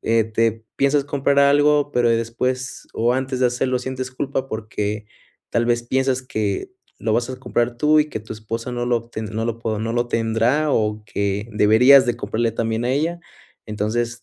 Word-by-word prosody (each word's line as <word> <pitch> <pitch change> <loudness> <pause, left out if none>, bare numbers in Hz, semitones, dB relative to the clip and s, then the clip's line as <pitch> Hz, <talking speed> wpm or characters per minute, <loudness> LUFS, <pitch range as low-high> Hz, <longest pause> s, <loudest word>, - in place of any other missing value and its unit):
eh, 115 -1 +2
te 115 0 0
piensas 140 0 +2
comprar 140 0 +1
algo, 145 +1 +4
pero, 120 -1 +3
después 125 +3 -2
o 120 +2 +2
antes 130 0 -2
de - - +3
hacerlo 125 +1 0
sientes 130 0 -5
culpa, 135 0 -3
porque, 105 -1 -3 0.5
tal 115 0 +1
vez, 120 0 +1
piensas 130 +1 0
que 110 - -3 0.3
lo 110 - -1
vas 120 +2 +1
a 130 - -5
comprar 120 -1 -1
tú 150 +4 +4
y 150 - +1
que 110 - -4
tu 110 - -9
esposa 115 +3 -5
no 120 0 -2
lo 120 -1 +2
obten 115 -1 -5
no 110 +1 -3
lo 115 0 -2
po 110 -2 -2
no 115 +1 -2
lo 120 0 0
tendrá 115 +7 +1
o 105 -1 0
que 100 +2 -2
deberías 125 +6 +6
de 120 -1 0
comprarle 115 +1 -1
también 115 +1 -2
a - - +1
ella. 165 +5 -1 0.5
Entonces 115 +3 -2
120 Hz, 190 wpm, -21 LUFS, 110-130 Hz, 0.5 s, deberías